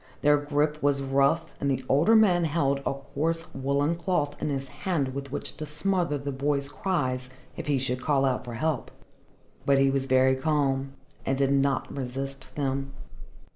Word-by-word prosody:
Their 145 0 +6
grip 150 +1 0
was 140 -1 +2
rough, 140 +4 +2
and 140 - 0
the 130 -1 -1
older 160 +12 +4
man 180 -6 +5
held 145 -3 +1
a - - 0
coarse 165 +4 -3
woollen 140 +3 +1
cloth 165 -4 -1
in - - -1
his 135 -1 -2
hand 140 -5 -2
with 140 0 -6
which 145 - -3
to 155 - -5
smother 170 0 0
the 140 0 -4
boy's 140 +1 0
cries 130 -7 -1 0.3
if - - -6
he 145 -2 +2
should 125 -1 -1
call 140 -1 +2
out 130 -2 0
for 120 -2 -7
help. 145 -1 -1 0.7
But 140 -1 +3
he 135 0 +4
was 135 0 -1
very 130 0 +4
calm 135 -2 0 0.3
and 135 - 0
did 135 0 +2
not 140 0 +1
resist 135 +1 -5
them. 135 -1 -2
140 Hz, 175 wpm, -27 LUFS, 135-150 Hz, 0.7 s, Their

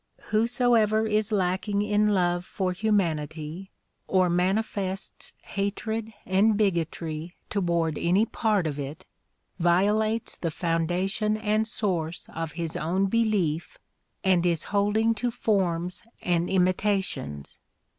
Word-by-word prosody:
AVhosoever 220 -1 +3
is 215 0 +1
lacking 200 +1 +1
in 210 0 +2
love 175 -3 +2
for 185 0 -2
humanity 175 -3 -1 0.4
or 185 -2 +3
manifests 190 +1 -1
hatred 220 +3 -3
and 200 +3 +3
bigotry 170 -4 -1 0.2
toward 170 -5 0
any 185 +6 +3
part 210 -5 +1
of 145 -2 -2
it, 145 +6 -6 0.5
violates 210 +6 +2
the 170 - -2
foundation 180 +6 0
and 215 0 +1
source 180 -8 -2
of 165 -1 -4
his 165 -1 -4
own 180 +5 +1
belief 195 -7 0 0.5
and 185 -2 +3
is 170 -3 +1
holding 210 +3 +3
to 240 +2 -1
forms 180 -6 0 0.2
and 175 -1 +1
imitations. 185 - 0
190 Hz, 110 wpm, -26 LUFS, 170-215 Hz, 0.5 s, AVhosoever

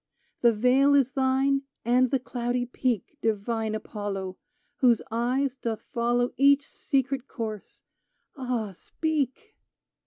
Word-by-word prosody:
The 235 - +6
vale 255 +6 +4
is 270 -2 +3
thine 270 0 +2 0.2
and 250 +2 +4
the 270 - +2
cloudy 245 -1 -2
peak, 250 +2 -2
Divine 220 0 -1
Apollo 200 -3 -4 0.4
Whose 245 -4 +4
eyes 250 +4 0
doth 230 -4 -4
follow 240 +1 +1
Each 280 +1 +5
secret 270 -1 -1
course! 220 -4 -6 0.5
Ah, 245 -6 -2
speak 315 - -3
250 Hz, 115 wpm, -27 LUFS, 225-270 Hz, 0.5 s, The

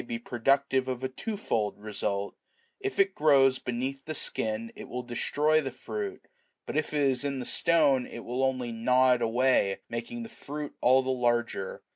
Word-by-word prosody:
523 115 0 -6
productive 135 +1 +2
of 130 0 -3
a 130 - -1
twofold 130 - -2
result: 105 -1 -3 0.4
if 400 0 -3
it 390 0 +4
grows 135 -3 +4
beneath 130 +3 -3
the 155 - -4
skin, 110 -3 -2
it - - -9
will 125 +1 -4
destroy 150 +6 +1
the 135 - -3
fruit, 390 - -6 0.4
but - - -5
if 155 0 0
it 150 -1 0
is 135 -1 +2
in 140 -1 -2
the 125 - -4
stone, 145 -6 +3
it 120 - -9
will 125 +2 -1
only 130 -2 0
gnaw 125 +3 +3
it 125 - -1
away, 115 -4 +2
making 115 - -5
the - - -7
fruit 150 -8 -7
all 130 +2 +5
the 130 - -1
larger. 120 -5 -1
130 Hz, 180 wpm, -29 LUFS, 120-145 Hz, 0.4 s, all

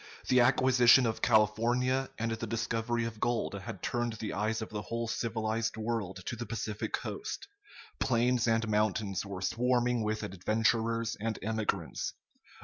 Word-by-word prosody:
The 125 - +5
acquisition 125 0 +6
of 110 -1 -1
California 120 +4 +2
and 115 0 -1
the 115 0 -3
discovery 115 +1 -1
of 115 -2 -6
gold 120 -2 0
had 95 -2 -7
turned 120 -2 -1
the 110 -1 -5
eyes 110 +2 0
of 110 - -5
the 105 -1 -4
whole 115 +2 -3
civilized 110 -1 -1
world 110 -5 -3
to - - -3
the 120 +1 -6
Pacific 110 -2 -3
coast. - - -4 0.5
Plains 125 -1 +2
and 115 0 +2
mountains 105 -2 0
were 95 -2 -6
swarming 120 +2 +1
with 110 0 -1
adventurers 110 +4 0
and 110 0 -2
emigrants. 110 0 -2
115 Hz, 145 wpm, -31 LUFS, 110-120 Hz, 0.5 s, acquisition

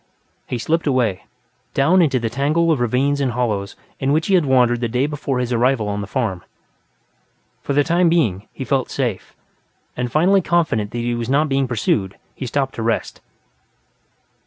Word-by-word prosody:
He 125 - -3
slipped 160 +7 -1
away, 125 -9 0 0.5
down 165 +7 +4
into 135 -6 +2
the 115 - -2
tangle 155 +6 +1
of 150 - +1
ravines 135 +4 +1
and 130 -3 0
hollows 105 -5 -2 0.2
in 135 +1 0
which 155 +2 +1
he 200 - 0
had 175 -6 +3
wandered 125 -2 +3
the 120 - 0
day 125 +4 0
before 145 -3 -3
his 125 -1 -1
arrival 120 -3 +1
at 105 - -3
the 100 - -6
farm. 100 -6 -2 1.2
For 140 - -3
the 145 +1 +3
time 170 +2 +2
being, 115 - +1
he 135 - -6
felt 130 +1 0
safe, 120 -8 -3 0.6
and 125 -1 -3
finally 185 +7 +4
confident 160 - 0
that 120 - -6
he 120 0 -1
was 120 0 -3
not 145 +3 +2
being 135 -1 +1
pursued, 105 -5 -1 0.2
he 130 - -6
stopped 135 +2 -1
to - - -6
rest. 115 0 -2
130 Hz, 185 wpm, -20 LUFS, 115-145 Hz, 1.2 s, down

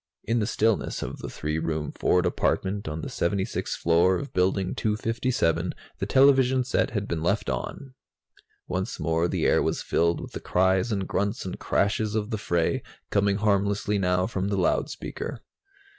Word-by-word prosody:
In 115 +1 +1
the 105 - 0
stillness 110 -1 0
of - - -6
the - - -6
three 75 +1 -3
room 80 -2 -2
Ford 90 0 +2
apartment 95 +2 0
on 75 +1 -4
the - - -5
76th 95 +2 -1
floor 85 +3 +3
of 140 - -5
Building 95 0 +1
257, 110 -6 0 0.2
the - - -2
television 130 -1 +5
set 125 - +1
had 105 -2 -3
been 85 -2 -2
left 100 +6 0
on. 135 -2 -5 0.7
Once 95 +1 -3
more 80 +1 +1
the - - -1
air - - +4
was - - -1
filled 85 +1 +1
with - - -8
the - - -5
cries 95 +5 +2
and 100 -3 -1
grunts 100 +1 -1
and 90 - -5
crashes 105 +1 0
of 110 +1 -1
the 110 - -2
fray, 85 -4 0 0.3
coming 100 -1 +2
harmlessly 100 0 +1
now 90 -1 +2
from 95 -2 -2
the 100 -1 -1
loudspeaker. 90 - -2
100 Hz, 170 wpm, -26 LUFS, 90-105 Hz, 0.7 s, television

